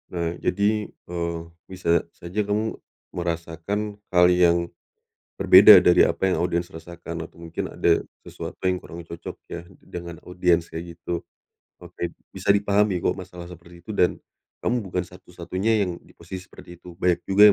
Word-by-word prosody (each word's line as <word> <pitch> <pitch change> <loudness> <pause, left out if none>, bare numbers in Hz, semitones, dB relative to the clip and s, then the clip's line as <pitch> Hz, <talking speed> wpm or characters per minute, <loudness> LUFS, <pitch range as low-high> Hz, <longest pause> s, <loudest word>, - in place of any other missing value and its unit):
Nah, 85 -1 -1
jadi, 105 +2 +1 0.2
eee, 85 -1 -2 0.3
bisa 85 -3 0
saja 90 +4 -6
kamu 105 +2 0 0.4
merasakan 85 +5 -3 0.2
hal 90 0 +7
yang 85 -1 +3 0.6
berbeda - - +9
dari - - +6
apa 95 - 0
yang - - +1
audiens 85 0 -1
rasakan 85 -1 -7
atau 85 - -17
mungkin 85 -1 -4
ada 85 -1 +2 0.2
sesuatu - - -7 0.2
yang 90 - -1
kurang 85 -1 -9
cocok 85 0 -8 0.2
ya, 85 0 -6 0.2
dengan 85 -1 -7
audiens 90 -2 +1
kayak 85 +1 -7
gitu. 85 0 -5 0.5
Oke, 85 - -5 0.2
bisa 95 +1 -7
dipahami 100 -1 +2
kok, - - +3
masalah 90 -2 -9
seperti 85 0 -13
itu 110 - -6
dan 90 -3 +2 0.5
kamu 120 +1 +1
bukan 90 -3 -3
satu-satunya 90 +4 -2
yang 90 -2 -5
di - - -22
posisi 90 +2 -9
seperti 85 0 -13
itu, 90 -1 -12
banyak 90 -1 +2
juga 100 +2 +7
yang 105 - +10
90 Hz, 160 wpm, -24 LUFS, 85-95 Hz, 0.6 s, yang